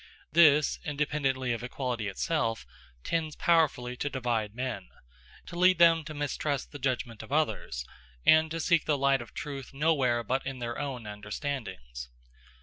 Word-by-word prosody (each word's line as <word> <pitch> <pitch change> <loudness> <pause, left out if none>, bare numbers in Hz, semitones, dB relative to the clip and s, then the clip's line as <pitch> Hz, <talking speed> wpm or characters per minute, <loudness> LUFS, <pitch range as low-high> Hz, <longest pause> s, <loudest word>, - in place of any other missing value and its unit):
This, 150 -3 +5
independently 140 -5 -1
of 115 - -4
equality 120 -3 -3
itself, 115 - -1 0.4
tends 160 -2 -1
powerfully 155 -8 +2
to 145 - -2
divide 115 -5 -2
men 125 - -4 0.6
to - - -9
lead 185 +1 +5
them 165 -1 +6
to 155 0 -7
mistrust 145 -1 -2
the 145 - -8
judgment 125 -4 -2
of - - -12
others, 145 - -1 0.4
and 155 0 +6
to 165 +1 -3
seek 165 -1 +2
the 150 -2 +2
light 135 -1 +3
of 120 - -12
truth 140 -2 -6
nowhere 135 -6 +2
but 130 +4 -1
in 135 -1 -5
their 120 -1 -4
own 135 -5 -4
understandings. 105 - -5
135 Hz, 150 wpm, -29 LUFS, 120-155 Hz, 0.6 s, them